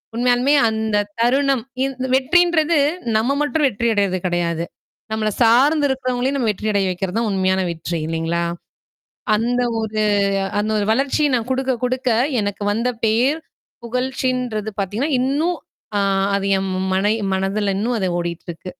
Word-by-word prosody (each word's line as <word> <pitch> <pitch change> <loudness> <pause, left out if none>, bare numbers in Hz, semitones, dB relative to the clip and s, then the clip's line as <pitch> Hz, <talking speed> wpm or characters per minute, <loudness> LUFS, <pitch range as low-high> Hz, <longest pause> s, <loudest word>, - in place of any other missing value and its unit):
உண்மையாலுமே 245 +3 +2 0.2
அந்தத் 215 -2 -1
தருணம், 270 0 +2 0.2
இந் 270 -1 -2
இந்த 260 - -2
வெற்றின்றது, 335 +3 +3 0.4
நம்ம 235 +5 +1
மட்டும் 295 0 +1
வெற்றி 235 0 -1
அடையறது 200 -3 +1
கெடையாது. 170 -1 -1 0.5
நம்மள 220 -1 0
சார்ந்து 275 +6 +4
இருக்கறவங்களையும் 255 0 -1
நம்ம 245 - 0
வெற்றி 210 +2 -4
அடைய 200 -2 +1
வைக்கிறது 185 +3 -3
தான் 230 - 0
உண்மையான 190 0 +1
வெற்றி, 170 +1 -4
இல்லீங்களா? 165 +1 -1 0.9
அந்த 240 +3 0 0.2
ஒரு 215 0 -2 0.6
அந்த 215 +1 -1
ஒரு 205 - 0
வளர்ச்சி, 275 +4 +1
நான் 230 -2 0
குடுக்க 260 0 0
குடுக்க 255 0 0 0.3
எனக்கு 205 0 -3
வந்த 230 +4 0 0.2
பேர், 245 +8 +2 0.5
புகழ்ச்சின்றது 250 -3 -2
பாத்தீங்கன்னா, 220 +10 -2
இன்னும் 300 +7 0 0.4
ஆ - - +2 0.4
அது 195 0 -2
என் 190 0 -2 0.2
மனய் 205 +4 +1 0.2
மனதுல 195 +1 -1
இன்னும் 230 +3 0
அது 190 - 0
ஓடிட்டுருக்கு. 170 +1 -6
225 Hz, 140 wpm, -20 LUFS, 195-260 Hz, 0.9 s, சார்ந்து